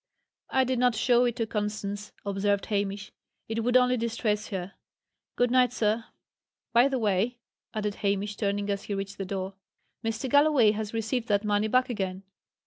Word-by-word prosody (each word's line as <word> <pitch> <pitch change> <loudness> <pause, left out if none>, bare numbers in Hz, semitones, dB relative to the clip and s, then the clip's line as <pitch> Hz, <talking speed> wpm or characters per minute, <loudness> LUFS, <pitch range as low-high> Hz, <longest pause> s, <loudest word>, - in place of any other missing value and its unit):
"I 265 - +3
did 255 -1 0
not 250 -2 +3
show 245 +2 +4
it 240 -2 0
to 230 -2 -1
Constance," 210 -1 -3
observed 200 0 0
Hamish. 200 -1 -2 0.4
"It 225 0 -2
would 245 +2 +4
only 250 0 +3
distress 225 -2 -1
her. 190 -1 -5 0.6
Good 245 0 +2
night, 250 -1 +4
sir. 225 -1 0 0.7
By 240 +3 +6
the 270 -1 -1
way," 215 +2 +1 0.4
added 210 -1 -1
Hamish, 205 +1 0
turning 205 -1 -1
as 200 0 -3
he 205 - -3
reached 195 0 -5
the 195 - -2
door: 190 0 -4 0.5
"Mr. 225 +3 -2
Galloway 285 -5 +5
has 215 +1 -4
received 225 +2 -1
that 205 0 +1
money 210 +1 +2
back 255 +3 +3
again." 190 -3 -3
215 Hz, 170 wpm, -28 LUFS, 200-240 Hz, 0.7 s, By